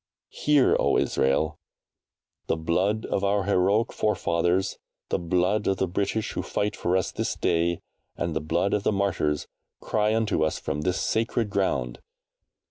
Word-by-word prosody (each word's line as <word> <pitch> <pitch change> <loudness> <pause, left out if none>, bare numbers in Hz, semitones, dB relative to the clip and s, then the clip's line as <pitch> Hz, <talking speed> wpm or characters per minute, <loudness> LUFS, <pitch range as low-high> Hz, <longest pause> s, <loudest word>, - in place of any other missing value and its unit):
HEAR, 145 -3 +3
O - - +3
ISRAEL! 75 +3 +1 0.9
The - - 0
blood 95 +7 0
of 100 - -1
our 100 0 +2
heroic 100 +3 +2
forefathers, 90 -2 0 0.3
the - - 0
blood 90 +4 +1
of 95 - +1
the 95 - 0
British 100 +4 -1
who - - -3
fight 105 +1 -2
for 90 +2 +1
us 95 - -1
this - - -2
day, 85 +1 0 0.4
and 85 -2 -2
the 80 - 0
blood 85 +5 0
of 105 - +1
the 100 - +1
martyrs, 95 -7 0 0.3
cry 105 0 +1
unto 110 -8 +1
us 80 - 0
from 75 - -3
this 90 +4 0
sacred 115 -1 0
ground. 65 -11 -1
95 Hz, 155 wpm, -26 LUFS, 85-105 Hz, 0.9 s, HEAR